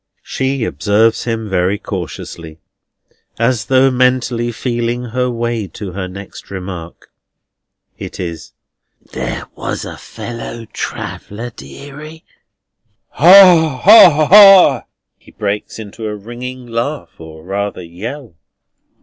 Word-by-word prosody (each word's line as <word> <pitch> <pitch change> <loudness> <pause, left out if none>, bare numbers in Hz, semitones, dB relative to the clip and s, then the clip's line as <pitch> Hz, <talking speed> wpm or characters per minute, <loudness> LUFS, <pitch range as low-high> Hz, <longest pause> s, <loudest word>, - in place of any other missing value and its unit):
She 130 -1 -2
observes 110 +1 +1
him 115 -2 -3
very 95 +1 0
cautiously, 80 - -7 0.8
as 115 -2 0
though 130 +4 +3
mentally 125 -2 0
feeling 120 0 -3
her 125 +1 -2
way 120 -3 -3
to 100 -3 -6
her 95 0 -5
next 100 +2 -11
remark. 90 -3 -8 0.9
It - - -8
is: 85 -4 -6 0.6
"There - - -4
was - - -5
a - - -8
fellow 115 0 -8
traveller, 115 +4 -6
deary." 145 - -12 0.8
"Ha, 170 -5 +6
ha, 170 -7 +8
ha!" 195 - +7 0.3
He - - -20
breaks 105 -1 -4
into 110 0 -7
a 105 - -4
ringing 125 +4 -8
laugh, 120 +6 -4
or 80 -1 -12
rather 100 0 -4
yell. 110 - -8
115 Hz, 110 wpm, -16 LUFS, 100-130 Hz, 0.9 s, ha